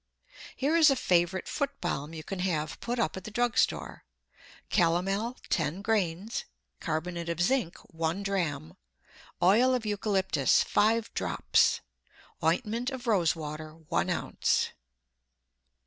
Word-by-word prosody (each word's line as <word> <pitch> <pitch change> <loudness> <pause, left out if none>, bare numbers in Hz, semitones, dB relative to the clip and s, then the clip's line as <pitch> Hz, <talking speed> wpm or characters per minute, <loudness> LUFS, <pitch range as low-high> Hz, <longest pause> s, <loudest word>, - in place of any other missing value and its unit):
Here 285 +5 +1
is 325 -2 +7
a 275 - +3
favorite 180 -4 +1
foot 280 - -2
balm 150 -3 -3
you 160 -1 -7
can 195 +4 -5
have 155 -5 -1
put 240 +1 -3
up 160 -9 0
at 190 - -7
the 215 - -7
drug 240 +2 0
store: - - 0 0.7
Calomel, 195 +7 +1
ten 160 +4 -1
grains; 210 - -1 0.3
carbonate 170 +1 -3
of 170 0 -2
zinc, 180 -1 +1 0.2
one 165 +4 -1
dram; 165 - -2 0.7
oil 235 +8 +5
of 240 -3 -3
eucalyptus, 195 -8 +2
five 225 +2 +2
drops; - - +2 0.6
ointment 235 +2 +1
of 260 -3 -7
rose 190 -9 +3
water, 155 0 -7
one 160 -2 -2
ounce. - - 0
190 Hz, 130 wpm, -29 LUFS, 165-225 Hz, 0.7 s, is